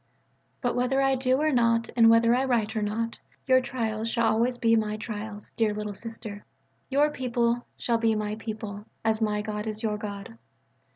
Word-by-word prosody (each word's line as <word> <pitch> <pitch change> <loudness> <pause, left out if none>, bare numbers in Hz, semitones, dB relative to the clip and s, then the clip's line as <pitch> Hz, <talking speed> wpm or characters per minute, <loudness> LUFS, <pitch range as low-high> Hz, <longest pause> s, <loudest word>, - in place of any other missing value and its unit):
But 245 - 0
whether 250 +2 +1
I 270 0 +3
do 260 0 +2
or 310 +1 +2
not 230 -2 +2
and 230 -1 +7
whether 230 +1 +5
I 255 +2 +2
write 230 -4 0
or 215 - 0
not, 225 +2 -2 0.3
your 260 -1 +5
trials 230 -3 -2
shall 230 0 +1
always 240 +3 +1
be 230 -1 +3
my 215 -1 0
trials, 215 -1 -6
dear 215 -2 0
"Little 210 -1 -4
Sister," 215 -1 -7 0.5
your 290 +2 +3
people 240 -3 0
shall 230 -1 0
be 225 -1 +2
my 210 0 -2
people, 215 -2 -6 0.2
as 220 0 +1
my 210 -1 0
God 210 0 -4
is 215 +1 -4
your 210 -1 -1
God. 210 +2 -7
230 Hz, 185 wpm, -27 LUFS, 215-245 Hz, 0.5 s, and